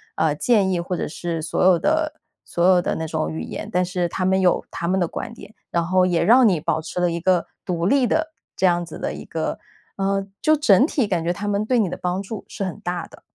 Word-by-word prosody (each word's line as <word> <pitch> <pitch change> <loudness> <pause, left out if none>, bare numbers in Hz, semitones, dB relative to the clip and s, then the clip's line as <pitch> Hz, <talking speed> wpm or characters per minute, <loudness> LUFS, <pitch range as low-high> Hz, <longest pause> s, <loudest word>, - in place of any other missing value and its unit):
啊， 160 -2 +2
建 200 +4 +2
议， 180 - 0
或 180 +1 -3
者 - - -2
是 165 +1 -4
所 155 - -1
有 185 -1 +6
的 315 - +1 0.3
所 170 - -1
有 185 -1 +5
的 - - -1
那 160 - -3
种 80 - -2
语 80 0 -4
言。 - - -6
但 180 +1 +1
是 180 -1 -1
他 185 - -2
们 190 +1 +2
有 180 -2 +2
他 170 - -4
们 190 +1 +2
的 175 - +1
观 220 - -6
点， 230 - -13 0.2
然 170 -1 +1
后 185 +1 +3
也 175 -2 +1
让 240 0 +6
你 175 - +1
保 160 0 -1
持 160 +3 -5
了 175 - +2
一 170 0 -3
个 180 -1 +2 0.2
独 170 -2 -2
立 260 +6 +3
的， 315 +5 0 0.2
这 190 - +2
样 175 -1 +3
子 165 - -9
的 - - -3
一 - - -8
个， 160 -1 -3 0.4
呃 195 0 0
就 310 0 +4
整 250 -4 +5
体 275 -7 0
感 175 -5 -1
觉 170 - 0
他 200 +3 -4
们 205 0 0
对 245 +2 +2
你 210 - +2
的 - - -4
帮 180 +1 -1
助 210 +1 -7
是 205 - -5
很 185 - -5
大 175 -3 -3
的。 - - -16
180 Hz, 280 characters per minute, -22 LUFS, 170-200 Hz, 0.4 s, 有